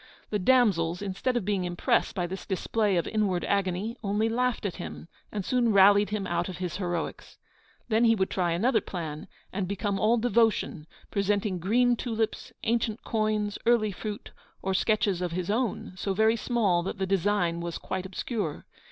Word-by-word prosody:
The 210 - +1
damsels, 185 -6 +3
instead 205 +6 -1
of 220 - -2
being 200 -2 0
impressed 175 0 0
by 180 - 0
this 190 +2 -6
display 205 0 0
of 170 - 0
inward 200 -5 0
agony, 200 +3 0
only 210 +2 +1
laughed 250 -1 0
at 195 - -3
him, 75 -1 -7 0.2
and 205 -3 -3
soon 245 -3 +2
rallied 200 +1 +6
him 210 -2 -2
out 175 0 -1
of 180 - -6
his 180 -3 -3
heroics. 175 -3 -4 0.5
Then 225 +1 +3
he 225 0 +5
would 190 -2 0
try 175 -2 0
another 220 +6 +2
plan, 160 -6 -6 0.3
and 190 -1 -2
become 200 +1 -2
all 225 +4 +3
devotion, 225 -9 +1 0.2
presenting 200 -1 0
green 240 +7 +3
tulips, 225 -2 -2
ancient 225 -1 0
coins, 215 -2 -1
early 225 -3 +4
fruit, 210 +2 -6 0.3
or 190 - 0
sketches 200 -2 +1
of 175 -2 -2
his 180 +2 -2
own, 230 -4 -1
so 190 +1 -2
very 220 +2 +4
small 215 -7 +1
that 190 +4 -4
the 190 - -1
design 190 -2 +1
was 170 -1 -4
quite 190 0 -4
obscure. 190 - -4
200 Hz, 175 wpm, -28 LUFS, 180-220 Hz, 0.5 s, rallied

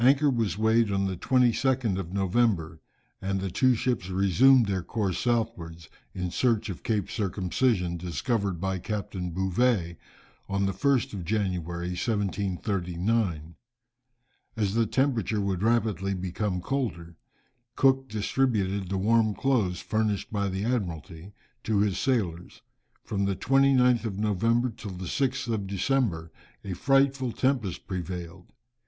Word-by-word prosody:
Anchor 140 +3 +5
was 115 -5 -1
weighed 110 0 +3
on 100 0 +1
the 95 -1 -2
22nd 125 -1 +2
of 90 -3 -5
November, 95 -5 0 0.4
and 95 0 -1
the 95 -1 -3
two 130 +6 +3
ships 115 -6 -1
resumed 110 +7 +5
their 95 -2 -1
course 95 -1 -2
southwards, 110 -9 -2 0.3
in 90 -2 -3
search 115 -1 +1
of 90 - -8
Cape 105 -5 -1
Circumcision, 95 -2 0
discovered 90 - -2
by 95 0 -2
Captain 95 -2 -4
Bouvet, 95 0 0 0.5
on 100 0 0
the 95 - +1
1st 130 +6 +1
of 95 -3 -5
January, 90 -3 -2
1739. 95 -2 -1 1.0
As 100 -3 0
the 115 0 +2
temperature 120 -5 0
would 95 -3 -1
rapidly 110 -4 +1
become 95 +1 -2
colder, 85 -9 -3 0.6
Cook 135 -1 +3
distributed 105 -4 0
the 95 - -1
warm 110 +1 +2
clothes, 110 -10 0
furnished 110 -2 -1
by 100 -1 0
the 95 +2 -3
Admiralty, 90 - -3 0.3
to 110 -2 +1
his 100 -3 0
sailors. 90 -10 -2 0.4
From 100 -2 -1
the 100 -1 0
29th 130 -1 +3
of 100 -4 -3
November 115 +4 +1
till 105 -3 -8
the 90 +1 -6
6th 130 - -1
of 100 -3 -2
December 100 -5 0 0.3
a 95 - -4
frightful 135 +3 +2
tempest 125 -7 -1
prevailed. 90 -1 -6
100 Hz, 135 wpm, -27 LUFS, 90-120 Hz, 1.0 s, Anchor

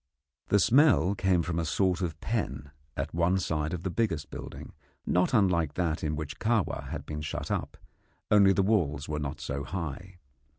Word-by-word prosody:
The 100 - +4
smell 115 - +5
came 95 -3 +2
from 85 0 -2
a - - 0
sort 90 +3 +1
of 80 -3 -3
pen 70 - -3 0.3
at 70 +3 -3
one 85 +3 +2
side 80 -4 -1
of 90 -1 -4
the 95 - -2
biggest 85 -9 -1
building, - - -8 0.3
not 90 +1 +2
unlike 90 - +2
that 85 -3 -1
in 75 0 -1
which 75 -1 -6
Kahwa 110 -3 0
had - - -5
been 75 0 -5
shut 75 - -4
up, - - -3 0.5
only 100 -2 +7
the 95 0 +2
walls 80 -9 +1
were 75 0 -2
not 70 0 -4
so 70 -2 -4
high. 90 +2 -6
85 Hz, 180 wpm, -29 LUFS, 75-95 Hz, 0.5 s, only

